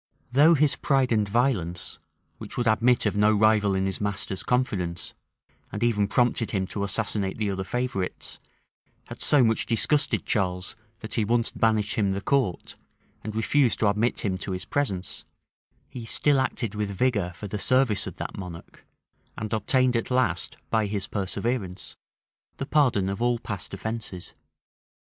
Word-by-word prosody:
Though 150 Hz, +6 st, +6 dB
his 150 Hz, -1 st, +3 dB
pride 135 Hz, -3 st, +1 dB
and 105 Hz, -3 st, +2 dB
violence, 100 Hz, -8 st, -1 dB, 0.4 s
which -, -, -8 dB
would 120 Hz, -, 0 dB
admit 115 Hz, +2 st, +3 dB
of 105 Hz, -, +1 dB
no 105 Hz, +1 st, +4 dB
rival 105 Hz, -2 st, +3 dB
in 95 Hz, 0 st, 0 dB
his 95 Hz, +1 st, -3 dB
master's 100 Hz, -2 st, -1 dB
confidence, 95 Hz, -10 st, -1 dB, 0.6 s
and -, -, -3 dB
even 105 Hz, -4 st, +2 dB
prompted 120 Hz, +1 st, +1 dB
him 95 Hz, -3 st, -1 dB
to 100 Hz, -, -2 dB
assassinate 100 Hz, -1 st, -1 dB
the 105 Hz, -2 st, -1 dB
other 95 Hz, 0 st, -3 dB
favorites, 110 Hz, -4 st, -3 dB, 0.7 s
had -, -, -9 dB
so 145 Hz, -3 st, +4 dB
much 115 Hz, -1 st, +1 dB
disgusted 145 Hz, +5 st, +1 dB
Charles, 90 Hz, -3 st, -1 dB, 0.3 s
that 110 Hz, -1 st, -6 dB
he 115 Hz, -, +2 dB
once 115 Hz, +2 st, +1 dB
banished 110 Hz, -2 st, +1 dB
him 100 Hz, -2 st, +2 dB
the 100 Hz, -, -2 dB
court, 125 Hz, -7 st, -1 dB, 0.5 s
and 110 Hz, 0 st, -5 dB
refused 120 Hz, +3 st, +2 dB
to 105 Hz, -, +4 dB
admit 105 Hz, +4 st, 0 dB
him 95 Hz, -3 st, -1 dB
to 95 Hz, -, -4 dB
his 90 Hz, -, -5 dB
presence, 100 Hz, -11 st, -2 dB, 0.6 s
he 120 Hz, -, -8 dB
still 120 Hz, +5 st, +2 dB
acted 125 Hz, -4 st, -1 dB
with 105 Hz, -1 st, -2 dB
vigor 100 Hz, -3 st, 0 dB
for 105 Hz, -, -7 dB
the 105 Hz, +1 st, -4 dB
service 130 Hz, -2 st, +2 dB
of -, -, -7 dB
that -, -, -6 dB
monarch, 90 Hz, -4 st, -10 dB, 0.5 s
and 110 Hz, 0 st, -4 dB
obtained 125 Hz, +4 st, +2 dB
at 115 Hz, -, -1 dB
last, 120 Hz, -10 st, 0 dB
by 110 Hz, -2 st, +2 dB
his 100 Hz, -1 st, -2 dB
perseverance, 100 Hz, -1 st, -3 dB, 0.6 s
the 135 Hz, -, -3 dB
pardon 130 Hz, -11 st, +2 dB
of 100 Hz, +3 st, -3 dB
all 120 Hz, 0 st, +2 dB
past 105 Hz, -4 st, -5 dB
offences. 100 Hz, -3 st, -5 dB
110 Hz, 160 wpm, -26 LUFS, 100-120 Hz, 0.7 s, Though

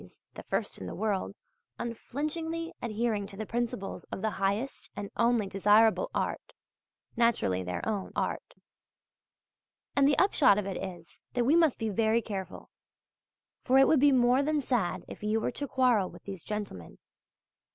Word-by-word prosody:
's -, -, -18 dB
(the -, -, -8 dB
first -, -, -3 dB
in 95 Hz, -, -6 dB
the -, -, -6 dB
world) 200 Hz, -1 st, -1 dB, 0.4 s
unflinchingly 310 Hz, +8 st, -4 dB
adhering 215 Hz, -2 st, -1 dB
to 200 Hz, -1 st, -10 dB
the 215 Hz, -, -4 dB
principles 230 Hz, -4 st, -3 dB
of 190 Hz, -, -7 dB
the 220 Hz, -, +1 dB
highest 205 Hz, +8 st, -1 dB
and 205 Hz, -1 st, -6 dB
only 235 Hz, -2 st, +2 dB
desirable 210 Hz, -, +4 dB
art -, -, -3 dB, 0.6 s
(naturally 230 Hz, -, +2 dB
their 90 Hz, 0 st, -4 dB
own 205 Hz, -3 st, -2 dB
art). -, -, -3 dB, 1.4 s
And 280 Hz, -1 st, +5 dB
the 285 Hz, -, +3 dB
upshot 310 Hz, -, +5 dB
of 210 Hz, -, -1 dB
it 195 Hz, -2 st, -3 dB
is, 175 Hz, -3 st, -8 dB
that 245 Hz, -1 st, +1 dB
we 290 Hz, +6 st, +4 dB
must 325 Hz, -5 st, +4 dB
be 225 Hz, -1 st, -2 dB
very 225 Hz, +2 st, +2 dB
careful; 195 Hz, -3 st, -6 dB, 0.9 s
for 260 Hz, +1 st, +4 dB
it 270 Hz, -, +7 dB
would 310 Hz, -, +4 dB
be 285 Hz, +1 st, +6 dB
more 250 Hz, 0 st, +4 dB
than 300 Hz, +1 st, +1 dB
sad 195 Hz, -10 st, -1 dB
if -, -, -10 dB
you 215 Hz, +1 st, +1 dB
were -, -, -1 dB
to 285 Hz, -, -4 dB
quarrel 245 Hz, -8 st, +2 dB
with -, -, -14 dB
these 195 Hz, -4 st, -7 dB
gentlemen. 205 Hz, -, -6 dB
225 Hz, 165 wpm, -29 LUFS, 200-260 Hz, 1.4 s, it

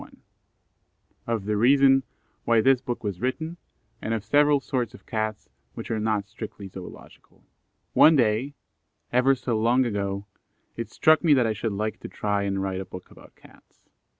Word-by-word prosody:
] -, -, -43 dB
Of 110 Hz, -4 st, -1 dB
the 105 Hz, 0 st, 0 dB
reason 135 Hz, +3 st, +5 dB, 0.4 s
why 115 Hz, -1 st, +3 dB
this 130 Hz, +2 st, +4 dB
Book 125 Hz, -3 st, -5 dB
was 100 Hz, -3 st, -4 dB
written, 160 Hz, +7 st, -3 dB, 0.4 s
and 115 Hz, -, -1 dB
of 110 Hz, -2 st, -5 dB
several 145 Hz, +3 st, +4 dB
sorts 125 Hz, -3 st, -3 dB
of -, -, -17 dB
Cats 110 Hz, -1 st, -3 dB, 0.3 s
which -, -, -7 dB
are 110 Hz, -, -1 dB
not 105 Hz, -2 st, -1 dB
strictly 105 Hz, -1 st, -8 dB
Zoological. 95 Hz, -1 st, -13 dB, 0.5 s
One 160 Hz, +1 st, +7 dB
day, 125 Hz, +3 st, +1 dB, 0.6 s
ever 130 Hz, +2 st, +4 dB
so 120 Hz, -3 st, -2 dB
long 120 Hz, +3 st, +3 dB
ago, 100 Hz, -3 st, -3 dB, 0.5 s
it -, -, -5 dB
struck 155 Hz, +2 st, +3 dB
me 155 Hz, -4 st, +5 dB
that 125 Hz, -3 st, +3 dB
I 110 Hz, -, 0 dB
should 110 Hz, 0 st, -3 dB
like 110 Hz, +2 st, -3 dB
to -, -, -8 dB
try 105 Hz, -1 st, -1 dB
and 100 Hz, -1 st, -1 dB
write 95 Hz, -1 st, -3 dB
a -, -, -7 dB
book 90 Hz, 0 st, -11 dB
about -, -, -17 dB
Cats. -, -, -22 dB
115 Hz, 175 wpm, -25 LUFS, 105-130 Hz, 0.6 s, One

